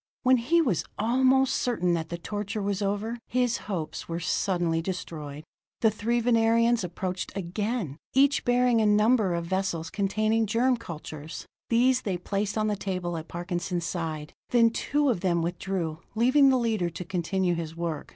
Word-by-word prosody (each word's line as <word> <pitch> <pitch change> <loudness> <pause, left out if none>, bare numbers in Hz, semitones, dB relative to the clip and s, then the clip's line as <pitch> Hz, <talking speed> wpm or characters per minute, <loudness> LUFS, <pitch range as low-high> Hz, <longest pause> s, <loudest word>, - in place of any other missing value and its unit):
When 255 0 +5
he 330 +8 +3
was 215 - 0
almost 260 +4 +3
certain 180 -8 +1
that 160 -1 -2
the 170 - -4
torture 205 +3 -4
was 200 0 -1
over, 205 +4 -2
his 245 -1 +1
hopes 170 -5 -4
were 165 0 -2
suddenly 175 -1 0
destroyed. 155 -5 -6 0.4
The 220 - +4
three 230 +3 0
Venerians 230 -1 +3
approached 180 +1 -4
again, 195 - -3 0.2
each 280 +1 +4
bearing 245 -1 +3
a 215 - +3
number 210 -2 +3
of 170 0 -2
vessels 175 -3 -2
containing 215 +2 +1
germ 245 +4 +2
cultures. 155 -7 -8 0.2
These 250 +2 +3
they 190 -4 -2
placed 200 +4 -2
on 215 - +1
the 210 -1 +1
table 185 -3 -3
at 160 0 -6
Parkinson's 175 0 -3
side; 160 -3 -4 0.2
then 230 -2 +5
two 290 +5 0
of 235 - +1
them 170 -2 +1
withdrew, 170 -2 -3 0.2
leaving 260 +5 +5
the 260 - +4
leader 220 -7 0
to 170 +2 -7
continue 180 0 0
his 165 -1 -4
work. 165 -3 -4
200 Hz, 165 wpm, -27 LUFS, 170-230 Hz, 0.4 s, When